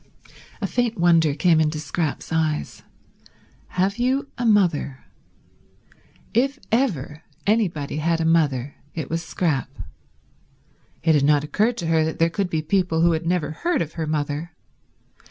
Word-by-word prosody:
A -, -, 0 dB
faint 245 Hz, -2 st, 0 dB
wonder 165 Hz, -4 st, +4 dB
came 165 Hz, 0 st, +4 dB
into 155 Hz, 0 st, 0 dB
Scrap's 155 Hz, +1 st, -3 dB
eyes. 155 Hz, -2 st, -1 dB, 0.9 s
Have 195 Hz, +4 st, -1 dB
you 265 Hz, +3 st, 0 dB
a 240 Hz, -, -1 dB
mother? 175 Hz, -10 st, +2 dB, 1.3 s
If 270 Hz, +5 st, +2 dB
ever 170 Hz, -, 0 dB, 0.2 s
anybody 180 Hz, -10 st, 0 dB
had 165 Hz, +2 st, +1 dB
a 165 Hz, -, 0 dB
mother 145 Hz, -5 st, +1 dB, 0.2 s
it 155 Hz, -4 st, -4 dB
was 165 Hz, 0 st, -1 dB
Scrap. 160 Hz, -6 st, -1 dB, 1.3 s
It 160 Hz, 0 st, +4 dB
had 145 Hz, -2 st, +3 dB
not 145 Hz, 0 st, +4 dB
occurred 215 Hz, +10 st, 0 dB
to 170 Hz, -, -4 dB
her 160 Hz, -1 st, +3 dB
that 160 Hz, 0 st, -2 dB
there 165 Hz, 0 st, +2 dB
could 195 Hz, 0 st, -1 dB
be 160 Hz, -2 st, -1 dB
people 170 Hz, -1 st, +1 dB
who 170 Hz, 0 st, +5 dB
had 165 Hz, +1 st, -2 dB
never 170 Hz, -4 st, 0 dB
heard 325 Hz, -, 0 dB
of 160 Hz, -, -10 dB
her 160 Hz, -2 st, -3 dB
mother. 150 Hz, +2 st, -2 dB
165 Hz, 150 wpm, -23 LUFS, 150-190 Hz, 1.3 s, who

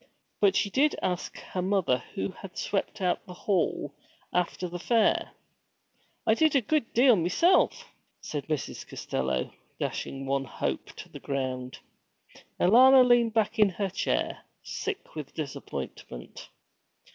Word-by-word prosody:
But 200 Hz, -1 st, +4 dB
she 200 Hz, -, +1 dB
did 290 Hz, +6 st, +3 dB
ask 180 Hz, -1 st, -2 dB
her 185 Hz, -, -5 dB
mother 185 Hz, -9 st, +1 dB, 0.2 s
who 195 Hz, -1 st, -2 dB, 0.2 s
swept 205 Hz, +1 st, -2 dB
out 180 Hz, -1 st, 0 dB
the 180 Hz, -, -9 dB
hall 175 Hz, -7 st, -1 dB, 0.4 s
after 180 Hz, +1 st, 0 dB
the 175 Hz, 0 st, -6 dB
fair. 230 Hz, +4 st, +2 dB, 1.0 s
'I 220 Hz, -, +5 dB
did 310 Hz, +5 st, +3 dB
a 275 Hz, -, +5 dB
good 290 Hz, +1 st, 0 dB
deal 245 Hz, 0 st, +6 dB
meself,' 270 Hz, -, +2 dB, 0.3 s
said 145 Hz, -2 st, -5 dB
Mrs. 155 Hz, -3 st, -4 dB
Costello, 65 Hz, -1 st, -2 dB, 0.3 s
dashing 135 Hz, 0 st, -3 dB
one 135 Hz, 0 st, 0 dB
hope -, -, -3 dB
to -, -, -10 dB
the -, -, -10 dB
ground. 130 Hz, -2 st, -3 dB, 0.8 s
Alanna 255 Hz, +7 st, +7 dB
leaned 235 Hz, -2 st, +4 dB
back 220 Hz, +1 st, +1 dB
in 210 Hz, -2 st, +6 dB
her 195 Hz, +1 st, -3 dB
chair, -, -, -1 dB, 0.2 s
sick 415 Hz, -1 st, -5 dB
with 150 Hz, -3 st, -8 dB
disappointment. 140 Hz, -, -7 dB
190 Hz, 135 wpm, -28 LUFS, 150-230 Hz, 1.0 s, Alanna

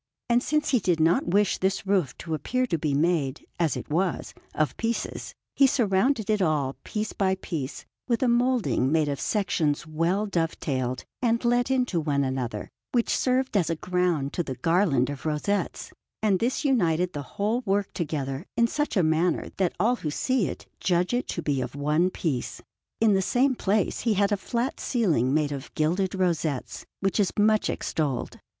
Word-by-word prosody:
And 240 Hz, +1 st, +4 dB
since 300 Hz, +2 st, 0 dB
he 255 Hz, -, +3 dB
did 180 Hz, -5 st, +1 dB
not 165 Hz, +2 st, +3 dB
wish 200 Hz, +3 st, +2 dB
this 190 Hz, +1 st, 0 dB
roof 190 Hz, -9 st, +1 dB
to 165 Hz, -, -5 dB
appear 255 Hz, -, 0 dB
to 170 Hz, -10 st, -1 dB
be 145 Hz, -2 st, 0 dB
made, 150 Hz, -3 st, 0 dB
as 165 Hz, -4 st, +1 dB
it -, -, -6 dB
was, 175 Hz, +3 st, -1 dB, 0.2 s
of 155 Hz, -1 st, 0 dB
pieces, 230 Hz, 0 st, -3 dB, 0.2 s
he 275 Hz, -, +6 dB
surrounded 225 Hz, -1 st, +2 dB
it 215 Hz, -2 st, +1 dB
all, 150 Hz, -6 st, +1 dB
piece 215 Hz, 0 st, -3 dB
by 190 Hz, -1 st, +1 dB
piece, 155 Hz, -7 st, -5 dB, 0.2 s
with 235 Hz, +2 st, +1 dB
a -, -, +3 dB
moulding 240 Hz, -, +2 dB
made 155 Hz, -1 st, +2 dB
of 140 Hz, -2 st, -2 dB
sections 170 Hz, -8 st, 0 dB
well 170 Hz, +6 st, 0 dB
dove 170 Hz, -5 st, -1 dB
tailed 130 Hz, -3 st, -2 dB, 0.2 s
and 235 Hz, -1 st, +1 dB
let 245 Hz, +1 st, +2 dB
into 250 Hz, -9 st, +1 dB
one 145 Hz, -3 st, 0 dB
another, 125 Hz, -5 st, -3 dB, 0.3 s
which 240 Hz, -2 st, +2 dB
served 260 Hz, -1 st, +1 dB
as 180 Hz, -5 st, +2 dB
a 165 Hz, -, 0 dB
ground 180 Hz, -5 st, 0 dB
to -, -, 0 dB
the 135 Hz, -6 st, -4 dB
garland 145 Hz, -3 st, +2 dB
of 140 Hz, -, -8 dB
rosettes; 155 Hz, +7 st, -2 dB, 0.3 s
and 200 Hz, -4 st, +3 dB
this 250 Hz, +5 st, -1 dB
united 180 Hz, -, +2 dB
the 145 Hz, -, -4 dB, 0.2 s
whole 215 Hz, +5 st, +1 dB
work 200 Hz, +1 st, 0 dB
together 145 Hz, -1 st, -3 dB
in 235 Hz, -, +5 dB
such 295 Hz, 0 st, -1 dB
a 185 Hz, -, +4 dB
manner 160 Hz, +2 st, +1 dB
that 185 Hz, -3 st, 0 dB
all 235 Hz, +6 st, +2 dB
who 155 Hz, -, -3 dB
see 245 Hz, -, 0 dB
it -, -, -7 dB
judge 180 Hz, +3 st, +1 dB
it 245 Hz, -, 0 dB
to 170 Hz, -, -4 dB
be 140 Hz, -3 st, 0 dB
of 125 Hz, +1 st, -5 dB
one 150 Hz, +5 st, +2 dB
piece. 155 Hz, -8 st, -3 dB, 0.4 s
In 220 Hz, -2 st, +4 dB
the 190 Hz, -, +3 dB
same 260 Hz, +7 st, +2 dB
place 205 Hz, -4 st, 0 dB
he 225 Hz, -3 st, +1 dB
had 200 Hz, +1 st, +2 dB
a -, -, +4 dB
flat 235 Hz, +6 st, -2 dB
ceiling 165 Hz, -, +1 dB
made 150 Hz, 0 st, +1 dB
of 140 Hz, -1 st, -6 dB
gilded 180 Hz, +5 st, 0 dB
rosettes, 165 Hz, -7 st, -1 dB
which 195 Hz, +2 st, 0 dB
is 200 Hz, -3 st, +2 dB
much 215 Hz, +1 st, +3 dB
extolled. 145 Hz, -6 st, -2 dB
180 Hz, 185 wpm, -26 LUFS, 155-220 Hz, 0.4 s, he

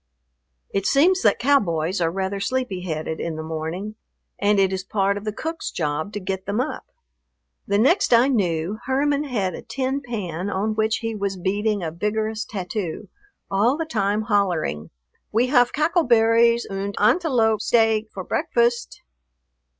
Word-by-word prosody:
It 195 Hz, -1 st, 0 dB
seems 360 Hz, +7 st, +4 dB
that -, -, +3 dB
cowboys 185 Hz, -, +1 dB
are 165 Hz, -, +2 dB
rather 190 Hz, +2 st, -3 dB
sleepy 205 Hz, -3 st, -2 dB
headed 160 Hz, -2 st, -4 dB
in 165 Hz, -1 st, -3 dB
the 160 Hz, -, -5 dB
morning 160 Hz, +6 st, -4 dB, 0.5 s
and 205 Hz, 0 st, +3 dB
it 190 Hz, -1 st, +3 dB
is 190 Hz, -, -2 dB
a 190 Hz, -, -21 dB
part 200 Hz, -1 st, +1 dB
of 205 Hz, +1 st, -6 dB
the 215 Hz, -, -1 dB
cook's 325 Hz, +9 st, -4 dB
job 155 Hz, +4 st, -2 dB
to 205 Hz, -, -3 dB
get 190 Hz, 0 st, -4 dB
them 205 Hz, +3 st, -1 dB
up. 265 Hz, +4 st, -3 dB, 0.8 s
The 200 Hz, -, +2 dB
next 275 Hz, -, +3 dB
I 240 Hz, +2 st, +6 dB
knew, 190 Hz, -5 st, 0 dB
Herman 285 Hz, +2 st, +1 dB
had 205 Hz, -9 st, -1 dB
a -, -, -7 dB
tin 270 Hz, +1 st, -2 dB
pan 200 Hz, -, -4 dB
on 205 Hz, +2 st, -1 dB
which 220 Hz, 0 st, +1 dB
he 225 Hz, -, -1 dB
was 200 Hz, -2 st, -3 dB
beating 205 Hz, +2 st, -1 dB
a 160 Hz, -, -3 dB
vigorous 215 Hz, +5 st, -2 dB
tattoo, 185 Hz, -3 st, -5 dB, 0.4 s
all 220 Hz, +8 st, +2 dB
the 325 Hz, -, -2 dB
time 210 Hz, -6 st, 0 dB
hollering, 185 Hz, -, 0 dB, 0.4 s
"We 240 Hz, +4 st, +2 dB
haf 245 Hz, -3 st, +4 dB
cackle 325 Hz, +3 st, +1 dB
berries 235 Hz, 0 st, +4 dB
und 195 Hz, +1 st, -4 dB
antelope 225 Hz, -, +3 dB
steak 225 Hz, -2 st, +2 dB
for 190 Hz, -, -6 dB
breakfast." 240 Hz, -, 0 dB
210 Hz, 165 wpm, -23 LUFS, 190-240 Hz, 0.8 s, I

